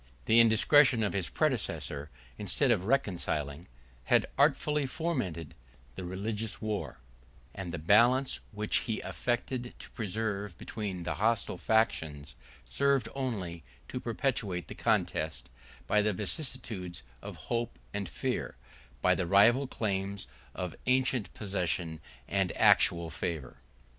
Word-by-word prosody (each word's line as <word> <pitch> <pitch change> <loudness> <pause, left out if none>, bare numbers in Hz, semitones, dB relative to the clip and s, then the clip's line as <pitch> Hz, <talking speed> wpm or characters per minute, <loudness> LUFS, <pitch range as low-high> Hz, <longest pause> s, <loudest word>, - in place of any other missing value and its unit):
The 115 +1 +6
indiscretion 115 +2 +6
of 105 - 0
his 95 -3 -1
predecessor, 110 - -1 0.3
instead - - +1
of 90 - +1
reconciling, 85 - -1 0.4
had - - +4
artfully 150 -2 +3
fomented 125 - -3 0.4
the 90 - -7
religious 105 +4 -3
war: 105 - -3 0.6
and 95 -3 -5
the 85 - -3
balance 120 - +4
which 105 0 0
he 110 -3 -1
affected 120 0 -2
to - - -11
preserve 105 -3 -3
between 100 -5 -5
the - - -1
hostile 110 -4 0
factions, 80 - 0 0.3
served 140 - +1
only 100 -11 -3 0.3
to 125 - -3
perpetuate 115 -7 -2
the - - -5
contest, 75 -6 0 0.3
by 105 - +3
the 105 0 +1
vicissitudes 105 - -4 0.2
of - - -7 0.2
hope 120 0 -1 0.2
and 100 -3 -3
fear, - - -2 0.5
by - - +5
the 90 - -1
rival 115 +9 +5
claims 100 -4 -2 0.3
of 90 -3 -4
ancient 130 -5 +2
possession 90 -5 -2 0.3
and 95 -3 +1
actual 85 -1 +4
favor. 80 -8 -4
105 Hz, 125 wpm, -31 LUFS, 90-120 Hz, 0.6 s, The